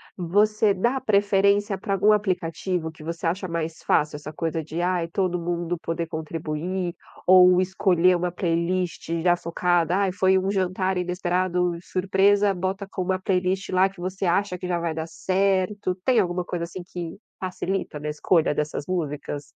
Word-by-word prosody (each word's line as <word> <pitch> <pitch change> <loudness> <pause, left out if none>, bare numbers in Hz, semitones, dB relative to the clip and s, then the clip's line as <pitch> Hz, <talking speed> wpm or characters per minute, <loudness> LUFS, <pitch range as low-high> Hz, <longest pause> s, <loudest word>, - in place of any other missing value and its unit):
você 205 +4 +2
dá 240 +8 0
preferência 200 -2 +2
para 195 +1 -3
algum 200 +2 +4
aplicativo 180 -4 -1
que 155 -1 -14
você 170 +2 -5
acha 185 +3 -1
mais 165 -1 -4
fácil, 150 0 +2
essa 150 +1 -8
coisa 160 +1 -3
de, 160 +3 -4
ai 175 -2 0
todo 180 0 -1
mundo 175 0 -2
poder 165 0 -3
contribuir, 165 +3 -4 0.3
ou 180 0 +7
escolher 185 -1 +3
uma 175 0 -1
playlist 175 0 -1
já 175 -1 +4
focada? 175 0 0
Ai 195 -2 +1
foi 190 0 +3
um 190 +1 0
jantar 185 -1 0
inesperado, 180 0 0
surpresa, 195 +2 +2
bota 190 +2 -3
com 190 - -4
uma 185 0 0
playlist 185 0 0
lá 185 +1 +3
que 195 -2 -17
você 185 +2 -3
acha 180 +1 +1
que 180 - -6
já 175 -1 0
vai 170 -1 -2
dar 160 +1 -4
certo. 190 +1 0
Tem 250 -3 +4
alguma 180 -2 0
coisa 175 -2 -3
assim 175 +1 -8
que 175 -1 -7 0.2
facilita 185 -3 -3
na 150 +1 -4
escolha 155 +1 +2
dessas 150 -1 -2
músicas? 150 -4 -3
180 Hz, 165 wpm, -24 LUFS, 170-190 Hz, 0.3 s, ou